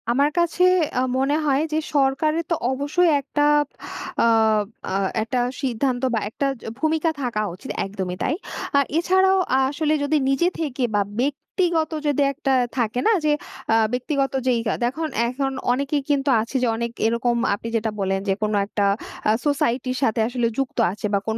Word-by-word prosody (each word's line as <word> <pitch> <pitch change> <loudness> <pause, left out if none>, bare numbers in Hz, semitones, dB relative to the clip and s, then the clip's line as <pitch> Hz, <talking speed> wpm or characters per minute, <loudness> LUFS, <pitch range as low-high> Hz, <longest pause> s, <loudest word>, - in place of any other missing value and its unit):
আমার 280 +5 +3
কাছে 345 +1 +2 0.3
আ - - +3 0.2
মনে 270 +2 +1
হয় 280 -1 +2
যে - - +2 0.2
সরকারের 290 +4 +2
তো 335 - +2 0.2
অবশ্যই 290 +6 +1
একটা 290 +2 -3 0.2
আব 295 - -3 0.5
আ - - +4 0.9
একটা 230 +4 -2 0.2
সিদ্ধান্ত 250 -1 -1
বা 225 - +2
একটা 275 - -3 0.2
য - - -10
ভূমিকা 320 +1 +1
থাকা 240 -5 -1
উচিত 180 - -8
একদমই 190 -2 -4
তাই। - - +1 0.4
আর 280 - +5
এছাড়াও 375 +2 +3 0.3
আসলে 300 +2 0
যদি 285 +2 +1
নিজে 275 +6 +2
থেকে 280 -5 -2
বা 205 - +3 0.2
ব্যক্তিগত 315 +4 0 0.2
যদি 290 0 +1
একটা 275 -1 -2 0.3
থাকে 235 0 0
না? - - +6
যে 300 - +4 0.4
আ - - +5 0.2
ব্যক্তিগত 270 +2 -1
যেই 245 -2 +3
কা - - +1
দেখুন 310 +7 -1 0.2
এখন 270 +2 -2 0.2
অনেকে 275 +3 0
কিন্তু 285 -1 +1
আছে 230 +5 -7
যে - - +3
অনেক 235 +1 -3
এরকম 235 +1 +1 0.2
আপনি 205 +3 -5
যেটা 220 -1 0
বললেন 195 0 0
যে - - +4
কোন 215 0 0
একটা 205 0 -2 0.5
আ - - +6
সোসাইটির 255 -3 0
সাথে 225 -2 +1
আসলে 240 -1 0
যুক্ত 270 -2 -2
আছে 205 +2 -6
বা 200 - +3
কোন 220 0 -1
270 Hz, 170 wpm, -22 LUFS, 235-295 Hz, 0.9 s, না